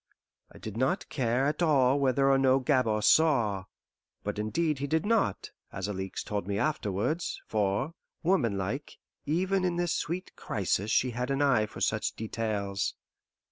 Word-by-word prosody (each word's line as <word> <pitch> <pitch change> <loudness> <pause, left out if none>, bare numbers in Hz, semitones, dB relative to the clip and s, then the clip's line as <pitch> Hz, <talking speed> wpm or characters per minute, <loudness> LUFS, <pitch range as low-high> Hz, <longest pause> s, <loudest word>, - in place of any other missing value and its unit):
I - - -14
did 110 0 -7
not 135 +10 0
care 125 -1 +1
at 150 +3 -1
all 140 -4 +4
whether 135 0 +3
or 135 - +4
no 130 0 +4
Gabord 125 -6 +1
saw; 115 -12 +3 0.6
but 105 0 -3
indeed 150 +7 0
he 140 - -2
did 160 +6 0
not, 210 - +1 0.2
as 100 0 -4
Alixe 95 -2 -4
told 100 -3 -3
me 100 -1 -1
afterwards, 150 - -1
for, 105 +8 0 0.3
womanlike, 125 - 0 0.3
even 185 +5 +1
in 180 -1 +1
this 175 -1 0
sweet 180 +4 -3
crisis 100 0 -1
she 125 +2 +2
had 125 +2 -3
an 135 +1 +1
eye 120 -7 +3
for - - -10
such - - 0
details. 105 -3 -2
130 Hz, 155 wpm, -29 LUFS, 105-155 Hz, 0.6 s, all